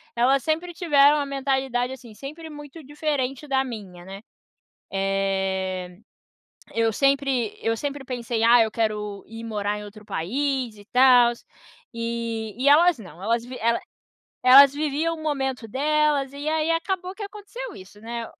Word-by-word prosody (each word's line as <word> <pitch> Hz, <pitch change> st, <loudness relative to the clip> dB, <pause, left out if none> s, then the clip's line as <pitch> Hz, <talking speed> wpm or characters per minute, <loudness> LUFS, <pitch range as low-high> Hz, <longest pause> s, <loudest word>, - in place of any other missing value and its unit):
elas 260 Hz, +3 st, +3 dB
sempre 330 Hz, +3 st, -1 dB
tiveram 295 Hz, -4 st, +4 dB
a 285 Hz, -, -1 dB
mentalidade, 265 Hz, -2 st, -1 dB
assim, 250 Hz, -4 st, -10 dB
sempre 310 Hz, +7 st, -9 dB
muito 295 Hz, +1 st, -10 dB
diferente 290 Hz, -2 st, -2 dB
da 265 Hz, 0 st, +2 dB
minha, 190 Hz, -7 st, -9 dB
né. 195 Hz, +1 st, -9 dB, 0.7 s
Eh, 190 Hz, -2 st, -1 dB, 0.8 s
eu 225 Hz, -1 st, +2 dB
sempre 275 Hz, -3 st, +1 dB
eu 225 Hz, 0 st, 0 dB
sempre 285 Hz, +1 st, -4 dB
pensei: 235 Hz, -3 st, -2 dB
"Ah, 235 Hz, 0 st, +7 dB
eu 220 Hz, -, 0 dB
quero 210 Hz, -3 st, -2 dB
ir 225 Hz, +1 st, -9 dB
morar 210 Hz, -2 st, -2 dB
em 210 Hz, -, -8 dB
outro 210 Hz, +1 st, -12 dB
país 255 Hz, -, -2 dB
e 205 Hz, -, -14 dB
tals", 245 Hz, -1 st, +5 dB, 0.5 s
e 230 Hz, -2 st, -3 dB
e 280 Hz, -, +4 dB
elas 330 Hz, +1 st, +6 dB
não, 180 Hz, -5 st, -12 dB
elas 230 Hz, +3 st, 0 dB
vi 255 Hz, +1 st, -8 dB
ela 230 Hz, +1 st, +1 dB, 0.6 s
elas 270 Hz, +2 st, +9 dB
viviam 310 Hz, +3 st, -1 dB
o 315 Hz, -, -10 dB
momento 265 Hz, -6 st, -2 dB
delas 290 Hz, +1 st, +1 dB
e 285 Hz, +2 st, -7 dB
aí 315 Hz, +1 st, 0 dB
acabou 365 Hz, +2 st, -2 dB
que 420 Hz, -, -8 dB
aconteceu 420 Hz, +4 st, -8 dB
isso, 195 Hz, +2 st, -14 dB
né? 230 Hz, +1 st, -5 dB
255 Hz, 155 wpm, -24 LUFS, 220-290 Hz, 0.8 s, elas